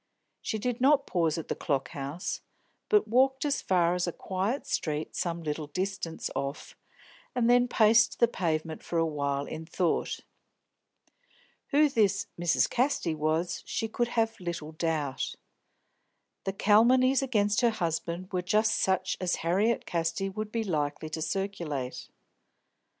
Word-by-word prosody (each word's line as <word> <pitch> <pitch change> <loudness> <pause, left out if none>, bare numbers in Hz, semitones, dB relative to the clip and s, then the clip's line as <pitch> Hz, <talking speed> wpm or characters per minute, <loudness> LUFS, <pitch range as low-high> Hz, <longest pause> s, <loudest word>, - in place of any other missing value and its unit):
She 220 - -2
did 245 +3 -2
not 280 +1 +5
pause 165 -4 +1
at 165 - -5
the - - -1
Clock 135 -5 -1
House, 145 +6 -4 0.5
but 420 -3 +4
walked 265 +4 +3
as 285 -1 0
far 175 -2 +2
as 180 0 0
a - - 0
quiet 195 +10 -2
street 155 -1 -2
some 170 -1 -2
little 150 0 -3
distance 185 +1 -3
off, 140 +1 -4 0.6
and 240 -2 +2
then 245 0 +5
paced 225 -1 +4
the 235 - +5
pavement 160 -6 -2
for 170 - -3
a 165 - +3
while, 140 -2 -1
in 160 +1 -6
thought. 175 0 -1 1.5
Who 300 +1 +4
this 215 -6 +2
"Mrs. 170 -2 +3
Casty" 250 - 0
was 155 +3 -1
she 225 - -1
could 240 +2 -1
have 225 0 +1
little 170 -4 -5
doubt. 155 -4 -2 1.1
The 195 - -1
calumnies 250 +6 +4
against 210 -5 +1
her 240 - +5
husband 170 -3 -3
were 180 - +1
just 215 +4 +2
such 190 0 +1
as 180 -1 +1
Harriet 200 +7 +2
Casti 170 +3 -1
would 215 +2 -5
be 230 0 -1
likely 155 -4 -2
to 160 +1 -4
circulate. 165 -9 -3
185 Hz, 145 wpm, -29 LUFS, 160-225 Hz, 1.5 s, not